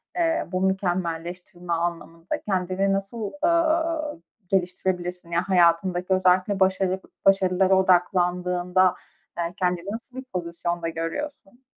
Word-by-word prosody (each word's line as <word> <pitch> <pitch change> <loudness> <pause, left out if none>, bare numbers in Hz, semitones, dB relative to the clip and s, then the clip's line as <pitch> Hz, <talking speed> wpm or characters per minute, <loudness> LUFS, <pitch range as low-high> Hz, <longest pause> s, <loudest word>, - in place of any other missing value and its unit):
eee, 330 -2 +1
bu 185 0 -1
mükemmelleştirme 175 -2 -2
anlamında 170 0 -3
kendini 190 0 0
nasıl, 200 +2 -3
ııı, 330 - +1 0.3
geliştirebilirsin? 180 -1 -1
Yani, 170 +1 +1
hayatındaki 180 0 +2
özellikle 185 +1 +3
başarı 190 0 +2 0.3
başarılara 190 0 +4
odaklandığında, 180 0 +2 0.4
eee, 170 0 -2
kendini 180 +1 -1
nasıl 240 +4 -8
bir 260 - -5
pozisyonda 170 -5 -3
görüyorsun? 240 - -5
185 Hz, 100 wpm, -25 LUFS, 175-195 Hz, 0.4 s, başarılara